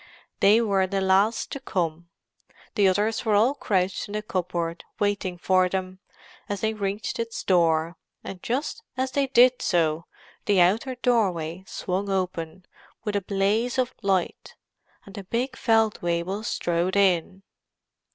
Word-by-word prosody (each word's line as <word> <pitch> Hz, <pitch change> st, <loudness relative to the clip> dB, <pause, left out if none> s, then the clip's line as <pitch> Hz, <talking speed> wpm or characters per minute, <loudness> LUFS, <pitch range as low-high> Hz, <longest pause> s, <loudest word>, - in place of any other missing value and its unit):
They 210 Hz, +4 st, +5 dB
were 195 Hz, -4 st, +1 dB
the 195 Hz, +1 st, -1 dB
last 195 Hz, +4 st, +2 dB
to 275 Hz, -, -4 dB
come. 170 Hz, -8 st, -3 dB, 0.6 s
The 205 Hz, -3 st, +3 dB
others 210 Hz, +4 st, +1 dB
were 215 Hz, -2 st, +2 dB
all 230 Hz, +7 st, +4 dB
crouched 190 Hz, -8 st, -1 dB
in 205 Hz, -, -9 dB
the 210 Hz, 0 st, -2 dB
cupboard, 175 Hz, -4 st, -3 dB
waiting 205 Hz, -3 st, -1 dB
for 185 Hz, +1 st, +2 dB
them, 185 Hz, 0 st, -4 dB, 0.5 s
as 205 Hz, -1 st, -3 dB
they 220 Hz, 0 st, 0 dB
reached 205 Hz, +1 st, -3 dB
its 230 Hz, 0 st, -4 dB
door; 165 Hz, -2 st, +2 dB, 0.3 s
and 185 Hz, -2 st, -8 dB
just 260 Hz, +6 st, -2 dB, 0.2 s
as 260 Hz, 0 st, -1 dB
they 275 Hz, +1 st, +1 dB
did 255 Hz, -1 st, +5 dB
so, 165 Hz, -2 st, +1 dB, 0.4 s
the 200 Hz, -2 st, +3 dB
outer 220 Hz, +9 st, +2 dB
doorway 190 Hz, -9 st, 0 dB
swung 195 Hz, +2 st, -3 dB
open, 185 Hz, -2 st, -3 dB, 0.4 s
with 210 Hz, -2 st, -2 dB
a 200 Hz, -, +1 dB
blaze 205 Hz, +6 st, 0 dB
of 255 Hz, -1 st, 0 dB
light, 190 Hz, -3 st, -1 dB, 0.5 s
and 195 Hz, -, -13 dB
the 200 Hz, -, -7 dB
big 245 Hz, +7 st, -2 dB
Feldwebel 205 Hz, -5 st, 0 dB
strode 175 Hz, -4 st, -1 dB
in. 190 Hz, -1 st, +2 dB
195 Hz, 145 wpm, -25 LUFS, 180-220 Hz, 0.6 s, They